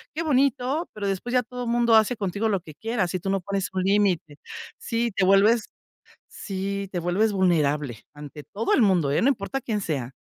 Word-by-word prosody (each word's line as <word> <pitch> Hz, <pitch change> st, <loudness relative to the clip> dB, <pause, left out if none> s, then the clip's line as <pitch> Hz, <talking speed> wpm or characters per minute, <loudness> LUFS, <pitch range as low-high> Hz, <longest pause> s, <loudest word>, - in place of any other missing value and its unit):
qué 330 Hz, -, -2 dB
bonito, 275 Hz, +1 st, +1 dB
pero 205 Hz, -1 st, -4 dB
después 195 Hz, +5 st, -3 dB
ya 250 Hz, -1 st, +3 dB
todo 245 Hz, 0 st, -6 dB
mundo 235 Hz, 0 st, +2 dB
hace 220 Hz, +3 st, +4 dB
contigo 205 Hz, +2 st, -1 dB
lo 200 Hz, -3 st, +1 dB
que 160 Hz, -3 st, -13 dB
quiera 225 Hz, 0 st, -2 dB
si 185 Hz, +1 st, -3 dB
tú 195 Hz, -, -4 dB
no 195 Hz, 0 st, +1 dB
pones 200 Hz, +1 st, -3 dB
un 185 Hz, -1 st, -2 dB
límite 190 Hz, -7 st, +1 dB, 0.4 s
sí, 235 Hz, 0 st, -1 dB
te -, -, +1 dB
vuelves 205 Hz, +4 st, +4 dB, 0.6 s
sí, 195 Hz, 0 st, -4 dB
te 180 Hz, -, -2 dB
vuelves 190 Hz, +6 st, +1 dB
vulnerable, 150 Hz, -, 0 dB
ante 145 Hz, 0 st, -10 dB
todo 220 Hz, +3 st, -2 dB
el -, -, +4 dB
mundo, 180 Hz, -9 st, +3 dB
¿eh?, 140 Hz, -, +2 dB
no 250 Hz, -, +3 dB
importa 270 Hz, +1 st, -1 dB
quién 220 Hz, -4 st, -2 dB
sea. 140 Hz, -9 st, -3 dB
200 Hz, 200 wpm, -25 LUFS, 180-230 Hz, 0.6 s, hace